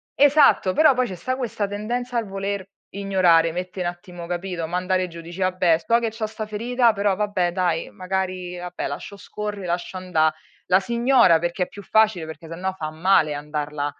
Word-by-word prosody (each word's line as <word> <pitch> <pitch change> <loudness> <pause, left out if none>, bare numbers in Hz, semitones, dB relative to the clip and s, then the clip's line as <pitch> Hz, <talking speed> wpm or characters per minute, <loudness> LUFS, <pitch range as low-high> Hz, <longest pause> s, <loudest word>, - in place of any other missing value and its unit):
Esatto. 285 -9 +5
Però, 310 -3 +6
poi 255 -1 0
ci 185 - -6
sta 255 +9 -3
questa 230 -5 -2
tendenza 235 +5 -3
al 225 -3 -1
voler 195 0 -4 0.2
ignorare, 180 -4 +3
mettere 180 0 -4
un 175 - -2
attimo, 175 -1 -11
capito, 175 -2 -3
mandare 185 +1 0
giù, 170 -1 -10
dici: 170 +3 -10
"Vabbè, 185 -3 +2
so 230 +7 +2
che 230 -1 -1
c'ho 225 0 -4
sta 215 0 -5
ferita, 235 +3 +2
però 200 -1 0
vabbè 185 -4 0
dai, 175 -3 0
magari 185 -1 -3
vabbè 180 0 -5
lascio 200 - -7
scorre, 205 -1 -6
lascio 175 +2 -3
anda" 160 -4 +1 0.4
La 185 +1 +5
si 190 - -8
ignora 235 -9 +5
perché 175 +2 -1
è - - -5
più 205 - -10
facile, 215 -5 +2
perché 160 +1 -10
sennò 185 +3 -3
fa 155 -5 -5
male 160 -1 +3
andarla 150 0 -4
185 Hz, 190 wpm, -23 LUFS, 175-210 Hz, 0.4 s, Però